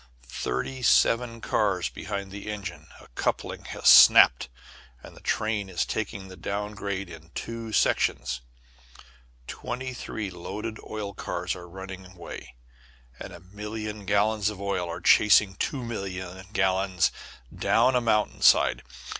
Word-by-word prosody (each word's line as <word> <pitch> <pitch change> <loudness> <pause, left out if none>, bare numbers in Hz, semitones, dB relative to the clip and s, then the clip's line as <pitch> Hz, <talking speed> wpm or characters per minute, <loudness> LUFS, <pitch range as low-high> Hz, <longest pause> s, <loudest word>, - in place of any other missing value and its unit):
Thirty 65 - -4
seven 115 -1 +3
cars 95 -6 0
behind 100 -1 -5
the 100 +1 -7
engine 95 -4 -7
a - - -15
coupling - - -3
has - - -3
snapped, - - +8 0.5
and - - -12
the - - -15
train 110 -3 -1
is 90 -2 -1
taking 95 -1 -4
the 95 - -11
down 105 +2 -4
grade 100 -2 -4
in 80 -1 -12
two 115 -1 -5
sections: 60 - +1 1.0
twenty 130 - -5
three 110 -5 -5
loaded 105 +5 -6
oil 105 -2 -5
cars - - -3
are 90 -1 -11
running 95 +1 -8
away, 85 -7 -10 0.6
and - - -8
a - - -11
million 105 +2 -7
gallons 105 +1 +2
of 105 -3 -8
oil 95 -3 -2
are 85 - -5
chasing 105 -2 +5
two 135 +3 -2
million 95 -4 -6
gallons 95 -3 +1 0.4
down 130 - +3
a 125 - +3
mountain 110 -2 +1
side! - - +5
100 Hz, 140 wpm, -26 LUFS, 95-110 Hz, 1.0 s, snapped